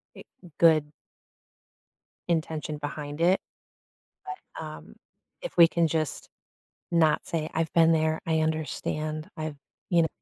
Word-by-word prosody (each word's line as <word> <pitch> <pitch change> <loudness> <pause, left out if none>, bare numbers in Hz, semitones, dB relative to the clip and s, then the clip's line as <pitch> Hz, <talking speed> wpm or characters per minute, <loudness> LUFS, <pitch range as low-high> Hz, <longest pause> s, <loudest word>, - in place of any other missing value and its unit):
eh - - -12 0.3
good 160 -3 +6 1.4
intention 155 -2 -1
behind 145 +1 -5
it, 180 +3 +4 1.2
but, - - -5
um, - - -10 0.5
if - - -5
we 170 -1 +9
can 170 -1 +2
just 155 -2 -2 0.6
not 160 -2 +3
say, 160 -2 -2
"I've 165 0 -1
been 165 -1 +6
there, 160 0 +2
I 160 -1 +2
understand, 155 0 -2
I've" 155 -1 -4 0.3
you 170 -2 +5
kn 160 - +2
160 Hz, 125 wpm, -27 LUFS, 155-165 Hz, 1.4 s, we